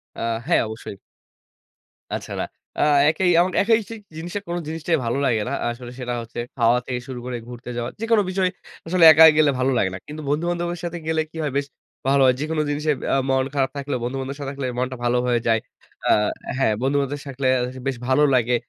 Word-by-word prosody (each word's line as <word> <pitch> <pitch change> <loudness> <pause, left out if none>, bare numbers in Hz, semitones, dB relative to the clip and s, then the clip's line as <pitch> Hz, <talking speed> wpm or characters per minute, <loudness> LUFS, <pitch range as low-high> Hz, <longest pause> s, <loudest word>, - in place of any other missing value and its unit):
আ - - -9 0.3
হ্যাঁ, 175 - +4
অবশ্যই। 110 -2 -8 1.2
আচ্ছা - - -7
না, - - 0 0.4
আ - - +2 0.3
একাই 180 +3 +1
এবং 180 +2 +3
একাই 225 +2 +4
সেই 225 -1 -7 0.2
জিনিসটা, 175 +5 -4
কোন 170 0 -2
জিনিসটাই 160 +1 0
ভালো 115 +3 0
লাগে 115 -5 +2
না - - -3 0.2
আসলে 120 +1 -7
সেটা 125 -1 -3
হচ্ছে 115 +1 -8 0.2
খাওয়া 120 -1 +3
থেকে 125 -2 -3
শুরু 130 -2 -6
করে 125 -1 -3
ঘুরতে 125 0 -9
যাওয়া। 120 0 -2
যেকোনো 225 -1 +3
বিষয়, 185 0 +1 0.4
আসলে 180 +1 +2
একা 155 +1 +8
গেলে 150 -2 +5
ভালো 130 +1 +2
লাগে 95 - +2
না। - - -4
কিন্তু 150 +1 -7
বন্ধু-বান্ধবের 175 +3 -1
সাথে 175 0 -3
গেলে 160 0 +1
কি 165 - -10
হয়? 145 - -1
বেশ 140 0 -1 0.4
ভালো 140 0 +4
হয়। 130 - +5
যেকোনো 155 +1 -1
জিনিসে 150 +1 0 0.2
আ - - +4
মন 130 0 +2
খারাপ 135 -1 +2
থাকলে 140 -1 -3
বন্ধু-বান্ধবদের 135 +3 -4
সাথে 140 - -3
থাকলে 140 -2 -4
মনটা 130 +1 -2
ভালো 120 +1 +2
হয়ে 120 -1 +2
যায়। 115 -1 +4 0.5
আ - - +6 0.5
হ্যাঁ, 130 -5 +2
বন্ধু-বান্ধবদের 140 +1 0
সা - - -11
থাকলে 135 0 -2 0.4
বেশ 135 -2 -1
ভালো 130 +3 +4
লাগে। 125 0 +2
140 Hz, 200 wpm, -22 LUFS, 125-160 Hz, 1.2 s, একা